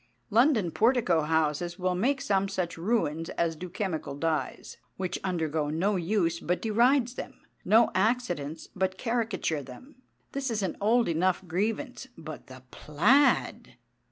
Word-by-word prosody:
London 225 Hz, -, +3 dB
portico 220 Hz, -8 st, +3 dB
houses 160 Hz, +2 st, 0 dB
will 185 Hz, 0 st, 0 dB
make 260 Hz, +10 st, 0 dB
some 195 Hz, -1 st, +1 dB
such 185 Hz, -3 st, -2 dB
ruins 165 Hz, -4 st, -1 dB
as 165 Hz, -1 st, +1 dB
do 180 Hz, +3 st, -7 dB
chemical 165 Hz, -7 st, -3 dB
dyes, 160 Hz, +1 st, -3 dB, 0.2 s
which 185 Hz, -1 st, -3 dB
undergo 160 Hz, -5 st, -1 dB
no 185 Hz, +7 st, 0 dB
use 170 Hz, -2 st, 0 dB
but 180 Hz, +1 st, -1 dB
derides 240 Hz, +3 st, +2 dB
them, -, -, -8 dB, 0.2 s
no 225 Hz, +2 st, +4 dB
accidents 185 Hz, -, -1 dB
but 190 Hz, 0 st, -1 dB
caricature 225 Hz, -, -1 dB
them. 250 Hz, -, -13 dB, 0.3 s
This 275 Hz, -1 st, -3 dB
is 215 Hz, -3 st, -1 dB
an 185 Hz, -, -2 dB
old 230 Hz, +3 st, +3 dB
enough 180 Hz, +3 st, 0 dB
grievance. 225 Hz, -, -2 dB
But 155 Hz, -1 st, -9 dB
the 130 Hz, -1 st, -12 dB
plaid! 245 Hz, -, +2 dB
185 Hz, 140 wpm, -28 LUFS, 165-225 Hz, 0.3 s, no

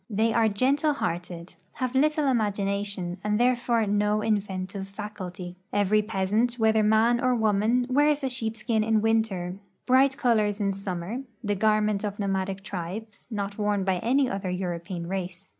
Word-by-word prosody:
They 220 Hz, +1 st, +1 dB
are 225 Hz, -1 st, +3 dB
gentle 275 Hz, +8 st, +2 dB
hearted, 175 Hz, -6 st, -4 dB, 0.2 s
have 255 Hz, -1 st, -2 dB
little 300 Hz, +2 st, +2 dB
imagination, 200 Hz, -6 st, -1 dB
and 210 Hz, +1 st, 0 dB
therefore 240 Hz, -2 st, +2 dB
no 210 Hz, +1 st, +1 dB
inventive 195 Hz, -2 st, -2 dB
faculty. 195 Hz, -3 st, -7 dB
Every 205 Hz, +1 st, +3 dB
peasant, 215 Hz, +4 st, 0 dB
Avhether 220 Hz, -1 st, +3 dB
man 220 Hz, +3 st, +3 dB
or 255 Hz, 0 st, +3 dB
Avoman, 220 Hz, +2 st, +2 dB
Avears 290 Hz, +2 st, +2 dB
a -, -, +1 dB
shee[>skin 225 Hz, -2 st, -1 dB
in 220 Hz, 0 st, +2 dB
Avinter, 205 Hz, -5 st, 0 dB, 0.3 s
bright 265 Hz, +1 st, +4 dB
colors 215 Hz, -5 st, +2 dB
in 200 Hz, -1 st, 0 dB
summer, 195 Hz, +3 st, -4 dB, 0.2 s
the 205 Hz, -, 0 dB
garment 215 Hz, 0 st, +1 dB
of 205 Hz, -1 st, -3 dB
nomadic 195 Hz, -1 st, -2 dB
triVjes, 200 Hz, +4 st, -6 dB
not 200 Hz, -3 st, -4 dB
Avorn 205 Hz, -2 st, 0 dB
by 190 Hz, -2 st, +1 dB
any 260 Hz, +6 st, +2 dB
other 195 Hz, -4 st, -3 dB
Euroi)ean 175 Hz, -1 st, -4 dB
race. 185 Hz, 0 st, -5 dB
210 Hz, 150 wpm, -26 LUFS, 195-230 Hz, 0.3 s, bright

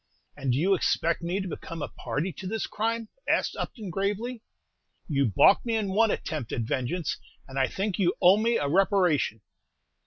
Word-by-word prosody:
"And 135 Hz, -3 st, -1 dB
do 125 Hz, -, +1 dB
you 185 Hz, +7 st, +3 dB
expect 170 Hz, -2 st, +1 dB
me 175 Hz, +3 st, -1 dB
to 190 Hz, -, -4 dB
become 165 Hz, -2 st, -6 dB
a -, -, -2 dB
party 150 Hz, +10 st, -3 dB
to 190 Hz, -, -5 dB
this 220 Hz, +2 st, -2 dB
crime?" 225 Hz, +1 st, -2 dB, 0.2 s
asked -, -, +1 dB
Upton, 210 Hz, -7 st, -5 dB
gravely. 210 Hz, +6 st, -2 dB, 0.7 s
"You 140 Hz, -4 st, +2 dB
balked 110 Hz, -, +5 dB
me 230 Hz, -2 st, -1 dB
in 215 Hz, -3 st, 0 dB
one 220 Hz, +4 st, +3 dB
attempt 150 Hz, -, -3 dB
at -, -, -1 dB
vengeance, 130 Hz, +8 st, -2 dB, 0.3 s
and 135 Hz, 0 st, -4 dB
I 130 Hz, -, +3 dB
think 195 Hz, +5 st, -3 dB
you 175 Hz, -2 st, +2 dB
owe 185 Hz, +3 st, +6 dB
me 230 Hz, +2 st, +2 dB
a 145 Hz, -, -1 dB
reparation!" 175 Hz, -, +2 dB
185 Hz, 185 wpm, -27 LUFS, 145-210 Hz, 0.7 s, owe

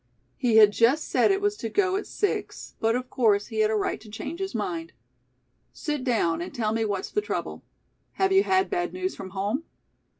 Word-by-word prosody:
He 240 Hz, -3 st, +1 dB
had 210 Hz, -2 st, +8 dB
just 255 Hz, +8 st, +3 dB
said -, -, +3 dB
it 390 Hz, 0 st, +2 dB
was 410 Hz, 0 st, +1 dB
to 225 Hz, -, -4 dB
go 380 Hz, -, +1 dB
at 405 Hz, -, -3 dB
six, 410 Hz, -, -3 dB
but, 225 Hz, +1 st, +2 dB
of 250 Hz, 0 st, -3 dB
course, 210 Hz, -5 st, +2 dB
he 220 Hz, -, -2 dB
had 215 Hz, 0 st, +4 dB
a 220 Hz, -, +1 dB
right 210 Hz, -, -1 dB
to 220 Hz, -, -13 dB
change 285 Hz, -, -6 dB
his 385 Hz, -6 st, -4 dB
mind. 170 Hz, -6 st, -3 dB, 0.8 s
"Sit 295 Hz, -4 st, -3 dB
down 170 Hz, -10 st, +1 dB
and 180 Hz, -, -5 dB
tell 220 Hz, -2 st, -1 dB
me 225 Hz, 0 st, 0 dB
what's 200 Hz, -3 st, -3 dB
the 420 Hz, -, +1 dB
trouble. 420 Hz, -, -4 dB, 0.5 s
Have 385 Hz, 0 st, +1 dB
you 385 Hz, 0 st, +6 dB
had 380 Hz, -1 st, +2 dB
bad 355 Hz, -2 st, -1 dB
news 370 Hz, +1 st, -3 dB
from 190 Hz, -, -8 dB
home?" 205 Hz, -, -2 dB
235 Hz, 210 wpm, -26 LUFS, -, 0.8 s, had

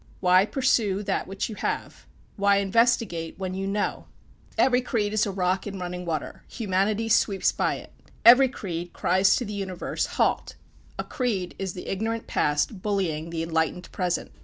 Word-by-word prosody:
Why 185 Hz, +2 st, +4 dB
pursue 220 Hz, -7 st, +1 dB
that 195 Hz, -1 st, -1 dB
which 195 Hz, 0 st, -3 dB
you 225 Hz, -, -6 dB
have? -, -, -4 dB, 0.3 s
Why 200 Hz, -1 st, +3 dB
investigate 200 Hz, -5 st, +1 dB
when 185 Hz, -1 st, -4 dB
you 195 Hz, +1 st, -3 dB
know? 205 Hz, +1 st, -2 dB, 0.5 s
Every 255 Hz, -1 st, +4 dB
creed 215 Hz, -5 st, -1 dB
is 215 Hz, 0 st, +2 dB
a -, -, -2 dB
rock 185 Hz, +1 st, 0 dB
in 200 Hz, -1 st, -5 dB
running 180 Hz, 0 st, -5 dB
water: 160 Hz, -3 st, -4 dB
humanity 210 Hz, +1 st, 0 dB
sweeps 205 Hz, -3 st, +3 dB
by -, -, 0 dB
it. -, -, -11 dB, 0.3 s
Every 250 Hz, +3 st, +9 dB
creed 175 Hz, -7 st, -5 dB
cries 190 Hz, +2 st, +3 dB
to 245 Hz, -, -2 dB
the 210 Hz, -, -6 dB
universe, 190 Hz, -3 st, -3 dB
"Halt!" -, -, +1 dB, 0.4 s
A -, -, -2 dB
creed 220 Hz, -10 st, -2 dB
is 190 Hz, -2 st, -3 dB
the 180 Hz, -, -8 dB
ignorant 225 Hz, +3 st, -2 dB
Past 150 Hz, +7 st, 0 dB
bullying 175 Hz, -6 st, -1 dB
the 165 Hz, -1 st, -3 dB
enlightened 165 Hz, +2 st, -1 dB
Present. 180 Hz, -2 st, -2 dB
195 Hz, 165 wpm, -26 LUFS, 180-215 Hz, 0.5 s, Every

